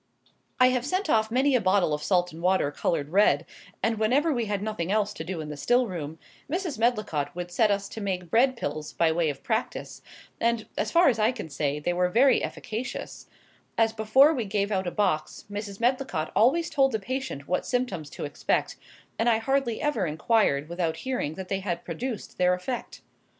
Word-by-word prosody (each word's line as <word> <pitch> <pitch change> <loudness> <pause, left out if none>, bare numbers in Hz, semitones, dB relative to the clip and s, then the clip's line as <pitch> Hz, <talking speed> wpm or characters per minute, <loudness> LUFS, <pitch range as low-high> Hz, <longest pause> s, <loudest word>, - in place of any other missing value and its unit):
I 255 0 +7
have 250 -1 0
sent 350 +4 -1
off 220 -1 +3
many 265 +4 +2
a 245 - +3
bottle 185 -4 +2
of 150 - -2
salt 180 +1 +1
and 165 - -9
water 180 -5 +2
coloured 145 -1 -1
red; 200 +5 +3 0.4
and 225 -1 +1
whenever 275 +9 +2
we 240 -3 -1
had 205 -1 -2
nothing 200 -5 -2
else 210 -1 +1
to 160 - -6
do 175 -1 -4
in 150 - -7
the 150 - -5
still 245 - +2
room, 160 -6 -5 0.3
Mrs. 340 - -2
Medlicott 215 -12 0
would 175 0 -5
set 215 +4 +3
us 200 -1 0
to 220 - -7
making 180 -3 -3
bread 255 +4 +3
pills, 150 -6 -4
by 165 -1 +2
way 165 -1 +1
of 140 - -6
practice; 225 +1 -3 0.4
and, 230 -1 +1
as - - -1
far 340 +1 +5
as 235 -5 +3
I 215 +3 +4
can 210 -10 -7
say, 145 0 -1
they 175 +4 -1
were 180 0 +1
very 255 +8 +4
efficacious, 240 +3 -5 0.5
as 225 -1 +3
before 225 +8 +5
we 245 -7 -2
gave 200 0 -1
out 190 -2 0
a - - -1
box 155 -7 -1
Mrs. 205 -1 -5
Medlicott 245 -10 0
always 325 +9 +3
told 270 -3 +3
the 220 - 0
patient 250 - -4
what 180 - 0
symptoms 245 - -2
to - - -6
expect; 145 - -1 0.4
and 230 +1 +3
I 225 - +4
hardly 240 0 0
ever 250 -12 0
inquired 155 -2 +1
without 170 -1 -2
hearing 245 - -2
that 190 -1 -7
they 195 0 -1
had 185 -3 -4
produced 245 -4 -5
their 180 0 +4
effect. 235 +7 -5
210 Hz, 205 wpm, -27 LUFS, 175-245 Hz, 0.5 s, I